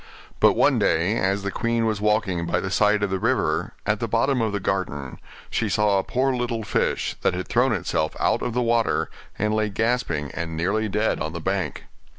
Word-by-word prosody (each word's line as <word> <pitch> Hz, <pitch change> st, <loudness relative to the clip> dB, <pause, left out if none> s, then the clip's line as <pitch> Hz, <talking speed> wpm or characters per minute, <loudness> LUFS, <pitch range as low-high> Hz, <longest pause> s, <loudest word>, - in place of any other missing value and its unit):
But -, -, +6 dB
one -, -, +3 dB
day 85 Hz, +6 st, +2 dB
as 95 Hz, +1 st, 0 dB
the 100 Hz, -, -2 dB
queen 115 Hz, +1 st, 0 dB
was 110 Hz, -2 st, -1 dB
walking 105 Hz, -5 st, +1 dB
by 85 Hz, -, +1 dB
the 95 Hz, -, -4 dB
side 105 Hz, +1 st, +3 dB
of 100 Hz, -, 0 dB
the 95 Hz, -, 0 dB
river, 115 Hz, -8 st, 0 dB
at -, -, +1 dB
the -, -, -2 dB
bottom 135 Hz, -3 st, +1 dB
of 110 Hz, -2 st, 0 dB
the 100 Hz, -, -2 dB
garden, 90 Hz, -9 st, -3 dB, 0.3 s
she 110 Hz, -, 0 dB
saw 105 Hz, -1 st, +2 dB
a -, -, -1 dB
poor 130 Hz, +1 st, 0 dB
little 120 Hz, -2 st, -2 dB
fish, 105 Hz, -, -1 dB
that -, -, +1 dB
had -, -, -4 dB
thrown -, -, +2 dB
itself 80 Hz, 0 st, -1 dB
out -, -, +1 dB
of 120 Hz, -, -2 dB
the 125 Hz, -, +2 dB
water, 115 Hz, -1 st, +1 dB, 0.3 s
and 105 Hz, +1 st, 0 dB
lay 110 Hz, 0 st, +1 dB
gasping 100 Hz, -, -1 dB
and 85 Hz, -2 st, -4 dB
nearly 105 Hz, +6 st, 0 dB
dead 105 Hz, +3 st, 0 dB
on 80 Hz, +1 st, -3 dB
the 85 Hz, -, -4 dB
bank. 95 Hz, +2 st, -2 dB
105 Hz, 210 wpm, -24 LUFS, 95-115 Hz, 0.3 s, But